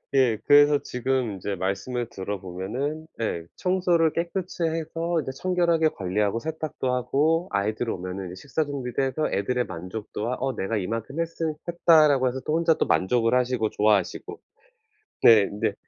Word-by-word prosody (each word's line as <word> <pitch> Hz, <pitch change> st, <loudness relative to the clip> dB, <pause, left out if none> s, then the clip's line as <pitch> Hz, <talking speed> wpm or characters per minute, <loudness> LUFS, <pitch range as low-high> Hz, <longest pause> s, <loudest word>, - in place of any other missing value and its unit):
예. 125 Hz, -5 st, +4 dB
그래서 145 Hz, 0 st, +6 dB
지금 125 Hz, -2 st, -1 dB
인제 100 Hz, +1 st, -4 dB
말씀을 105 Hz, +7 st, -2 dB
들어 100 Hz, -2 st, -5 dB
보면은 115 Hz, -, -4 dB, 0.2 s
예 85 Hz, -7 st, -2 dB
청소를 180 Hz, -3 st, +2 dB
깨끗이 175 Hz, +1 st, -3 dB
해서 165 Hz, +1 st, -1 dB
인제 130 Hz, -3 st, -4 dB
청결하게 170 Hz, -3 st, +2 dB
관리하고 100 Hz, 0 st, -1 dB
세탁도 155 Hz, -3 st, -3 dB
하고 155 Hz, +7 st, +1 dB
아이들 105 Hz, +4 st, -1 dB
오면은 90 Hz, +1 st, -5 dB
이제 90 Hz, -, -8 dB
식사 145 Hz, +2 st, -1 dB
준비도 135 Hz, -3 st, -3 dB
해서 145 Hz, +4 st, -1 dB
애들의 125 Hz, +5 st, 0 dB
만족도와 105 Hz, +7 st, -5 dB
'어 135 Hz, 0 st, -1 dB
내가 110 Hz, +4 st, -2 dB
이만큼 115 Hz, -, -4 dB
했은 165 Hz, -1 st, -2 dB
했다.'라고 155 Hz, -6 st, +4 dB
해서 130 Hz, -, -4 dB
또 155 Hz, -, -1 dB
혼자 165 Hz, -1 st, +3 dB
만족을 115 Hz, +5 st, +2 dB
하시고 125 Hz, -3 st, +1 dB
좋아하시고. 105 Hz, -1 st, 0 dB, 0.8 s
네 110 Hz, -4 st, +7 dB
근데 100 Hz, -, -1 dB
125 Hz, 350 characters per minute, -25 LUFS, 105-160 Hz, 0.8 s, 네